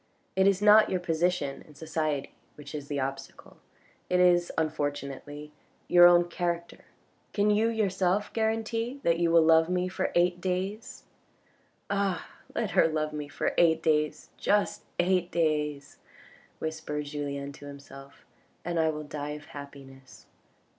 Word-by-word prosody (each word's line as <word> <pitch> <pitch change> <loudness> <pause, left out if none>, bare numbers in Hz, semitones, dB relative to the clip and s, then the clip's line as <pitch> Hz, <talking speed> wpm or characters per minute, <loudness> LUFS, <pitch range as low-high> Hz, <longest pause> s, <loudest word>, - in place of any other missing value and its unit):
It 190 +1 +4
is 200 0 +2
not 210 +1 +7
your 185 - 0
position 170 -4 -1
in 150 - -17
society 155 -2 -3 0.2
which 145 -1 -11
is 145 -2 -6
the 145 -1 -2
obstacle, 135 0 -6 0.5
it 180 - +2
is 175 -1 +4
unfortunately 145 -1 -3 0.4
your 175 0 +8
own 175 0 +5
character. 170 -1 -4 0.5
Can 205 0 +2
you 215 +2 +3
yourself 200 -2 0
guarantee 225 +3 -1
that 170 0 +2
you 170 -1 +2
will 165 -1 +5
love 160 +1 +5
me 180 0 0
for 185 - -2
eight 175 0 +2
days? 190 +4 -3 0.3
" - - -37
" - - -15
Ah! 200 -3 -1 0.3
let - - -1
her - - +4
love 155 -1 -2
me 150 -1 -5
for 145 - -2
eight 160 -1 +4
days, 150 -1 0
just 205 0 0
eight 180 0 +2
days," 150 -4 -1 0.6
whispered 155 -2 -4
Julien 140 -1 -4
to 145 0 -12
himself, 140 -1 -13 0.4
"and 170 -1 -1
I 160 0 +3
will 155 -1 -4
die 150 0 -5
of 150 - -14
happiness. 135 -2 -12
160 Hz, 150 wpm, -28 LUFS, 145-180 Hz, 0.6 s, your